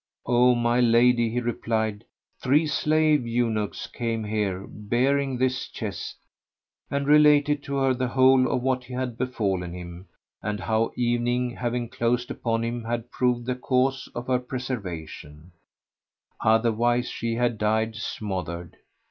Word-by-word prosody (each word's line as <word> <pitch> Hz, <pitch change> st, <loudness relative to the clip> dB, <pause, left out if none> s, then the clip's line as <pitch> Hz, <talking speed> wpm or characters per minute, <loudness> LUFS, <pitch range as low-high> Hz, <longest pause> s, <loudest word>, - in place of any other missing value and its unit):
"O 125 Hz, +1 st, +4 dB
my 120 Hz, 0 st, +1 dB
lady," 120 Hz, 0 st, +4 dB
he 120 Hz, +2 st, -1 dB
replied, 110 Hz, -3 st, -2 dB, 0.4 s
"three 145 Hz, +5 st, +3 dB
slave 155 Hz, -3 st, +2 dB
eunuchs 115 Hz, -3 st, -1 dB
came 115 Hz, -2 st, -3 dB
here 105 Hz, -3 st, -2 dB
bearing 130 Hz, +5 st, 0 dB
this 130 Hz, 0 st, 0 dB
chest;" -, -, -6 dB, 0.7 s
and 140 Hz, 0 st, -1 dB
related 150 Hz, 0 st, +5 dB
to 140 Hz, 0 st, -5 dB
her 135 Hz, -1 st, +2 dB
the 125 Hz, 0 st, -1 dB
whole 130 Hz, +1 st, +4 dB
of 125 Hz, -, -1 dB
what 130 Hz, -1 st, 0 dB
had 125 Hz, -1 st, -4 dB
befallen 100 Hz, -8 st, -2 dB
him, 90 Hz, +1 st, -9 dB, 0.3 s
and 105 Hz, 0 st, -3 dB
how 110 Hz, +3 st, +1 dB
evening 120 Hz, +1 st, 0 dB
having 120 Hz, 0 st, -2 dB
closed 120 Hz, +1 st, -1 dB
upon 115 Hz, -1 st, -1 dB
him 120 Hz, 0 st, -3 dB
had 115 Hz, +1 st, -4 dB
proved 125 Hz, -1 st, 0 dB
the 125 Hz, -, 0 dB
cause 130 Hz, +1 st, 0 dB
of 120 Hz, -, -4 dB
her 125 Hz, -1 st, +1 dB
preservation, 90 Hz, -, -6 dB, 0.9 s
otherwise 115 Hz, +2 st, +2 dB
she 115 Hz, -1 st, -3 dB
had 120 Hz, -2 st, 0 dB
died 110 Hz, +1 st, +1 dB
smothered. 90 Hz, -7 st, -5 dB
120 Hz, 135 wpm, -25 LUFS, 110-125 Hz, 0.9 s, related